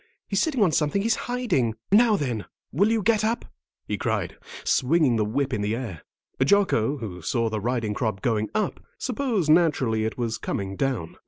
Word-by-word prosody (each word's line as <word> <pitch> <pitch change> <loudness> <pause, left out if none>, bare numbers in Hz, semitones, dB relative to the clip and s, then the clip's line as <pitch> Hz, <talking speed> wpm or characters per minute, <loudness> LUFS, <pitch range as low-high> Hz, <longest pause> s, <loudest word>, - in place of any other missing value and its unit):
He's - - +1
sitting 275 -9 +2
on 180 - +3
something 155 +6 +1
he's 225 0 +2
hiding. 185 - 0 0.2
Now, 220 +1 +6
then, 125 - -2 0.3
will 200 +9 +3
you 225 -2 +1
get 215 -1 +3
up?" 230 +3 0 0.4
he - - -2
cried, - - -1 0.3
swinging 140 -2 +3
the 110 - +2
whip 130 +5 -1
in 105 - 0
the 105 +2 0
air. 115 -11 -6 0.4
Jocko, 145 - +3
who 100 -8 -7
saw 115 +6 0
the 110 - -1
riding 115 -2 -1
crop 110 -3 -2
going 110 -3 0
up, 215 -3 -1 0.2
supposed 235 - 0
naturally 140 -10 +3
it 110 - -3
was 115 -2 -2
coming 95 0 -3
down. 125 -9 -2
130 Hz, 180 wpm, -25 LUFS, -, 0.4 s, Now